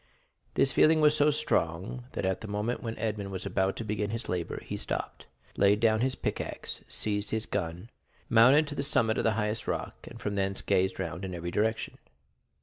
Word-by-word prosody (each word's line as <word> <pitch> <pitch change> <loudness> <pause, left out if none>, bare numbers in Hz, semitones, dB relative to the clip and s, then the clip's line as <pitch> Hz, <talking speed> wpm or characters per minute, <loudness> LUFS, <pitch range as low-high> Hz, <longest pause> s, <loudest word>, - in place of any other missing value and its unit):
This 135 - +3
feeling 155 0 +5
was 150 -1 +5
so 150 0 +4
strong 120 - -1
that - - -2
at 95 0 0
the 110 - -6
moment 105 +4 -2
when 115 -1 -4
Edmond 105 -3 -2
was 95 -1 -5
about 95 0 0
to - - -4
begin 105 -1 -2
his 115 +2 -4
labor, 90 -2 -2
he - - -4
stopped, - - -4 0.3
laid 100 +1 +4
down 110 -1 +3
his 130 +1 +1
pickaxe, - - -4
seized 105 -1 -1
his 110 0 -1
gun, 90 +4 -4 0.4
mounted 130 +7 +6
to - - -5
the 140 - -2
summit 115 -6 +2
of - - 0
the 110 - +3
highest 105 0 -2
rock, - - -4
and - - -10
from 105 - -3
thence 95 -1 -1
gazed 95 0 +1
round 90 0 -4
in 95 -2 -4
every 85 0 -4
direction. 110 +3 -1
105 Hz, 200 wpm, -29 LUFS, 95-115 Hz, 0.4 s, mounted